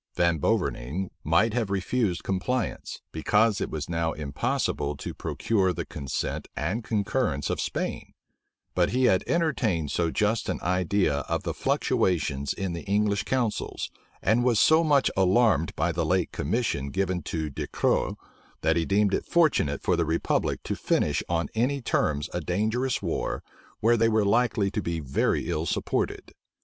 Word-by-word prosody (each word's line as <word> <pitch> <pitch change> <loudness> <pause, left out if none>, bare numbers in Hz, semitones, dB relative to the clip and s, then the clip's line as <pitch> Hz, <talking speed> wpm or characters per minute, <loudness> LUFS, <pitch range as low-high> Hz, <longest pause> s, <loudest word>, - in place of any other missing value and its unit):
Van 85 -2 +2
Boverning 75 +7 -1
might 100 +9 +3
have 115 -4 0
refused 100 0 0
compliance, 110 +6 -2
because 105 -1 +2
it - - -1
was 75 -1 -4
now 85 -1 -1
impossible 70 0 -2
to - - -6
procure 95 -5 0
the 90 - -4
consent 70 -2 -4
and 110 +6 -2
concurrence 105 - 0
of - - -1
Spain; - - -3 0.6
but 90 -1 +2
he 130 +1 +1
had 95 -7 +4
entertained 115 - 0
so 85 -1 +1
just 105 +6 0
an - - -1
idea 90 -3 +1
of - - -1
the - - -2
fluctuations 75 -6 0
in 95 -3 -3
the 85 - -4
English 100 0 +1
counsels, 125 -5 -2 0.3
and 110 +5 +3
was 120 -4 +3
so 160 +1 +5
much 145 -4 +3
alarmed 95 -3 +3
by 80 +4 +1
the 85 0 -1
late 90 +3 +1
commission 75 - -1
given 95 +1 -1
to 80 0 -3
Du - - -4
Cros, - - +1 0.5
that 80 0 +2
he 85 -1 +1
deemed 100 +1 +2
it - - -1
fortunate 150 - +2
for 90 - +2
the 85 - +1
republic 80 +1 0
to - - -2
finish - - +1
on 85 -2 0
any 125 +5 +1
terms 75 - 0
a 90 - -2
dangerous 110 +9 0
war, - - -2 0.4
where 115 +2 +4
they 115 0 +3
were 110 -2 +2
likely 110 -2 +2
to 105 - -2
be 85 -3 -2
very 70 -3 0
ill 80 +2 -1
supported. - - -2
95 Hz, 160 wpm, -27 LUFS, 80-115 Hz, 0.6 s, so